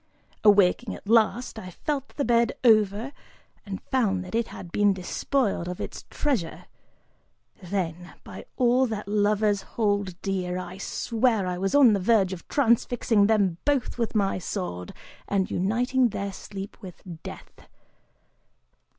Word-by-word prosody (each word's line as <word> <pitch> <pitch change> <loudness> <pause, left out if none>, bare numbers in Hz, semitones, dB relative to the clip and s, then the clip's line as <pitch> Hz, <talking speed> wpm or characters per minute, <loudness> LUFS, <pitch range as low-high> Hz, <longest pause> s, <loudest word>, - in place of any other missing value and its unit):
Awaking 205 +2 +4
at - - -13
last, 225 +1 +2
I 185 - -8
felt 275 - -4
the 285 - -1
bed 235 +1 +3
over 215 +1 +3 0.6
and 195 -1 -6
found 195 -8 +1
that 180 - -10
it 230 0 0
had 175 - -10
been 205 +1 +3
despoiled 195 +1 -1
of 180 0 -5
its - - -6
treasure: 240 - -2 1.0
then, 180 -2 -3
by - - -10
all 255 +1 +3
that 215 -3 -5
lovers 205 0 +2
hold 205 -5 -1
dear, 180 -2 -2
I 185 +1 -7
swear 225 0 0
I 180 -1 -3
was 195 +7 0
on 265 -6 +7
the 200 - +1
verge 195 -1 +3
of 175 - -9
transfixing 235 -4 +2
them 200 -6 +2
both 275 -4 0
with 230 -1 -1
my 195 -3 +1
sword 170 - -5 0.4
and 195 -2 0
uniting 245 +6 +1
their 200 -1 -4
sleep 195 0 -8
with 185 -4 -11 0.2
death. - - -11
205 Hz, 140 wpm, -26 LUFS, 185-235 Hz, 1.0 s, on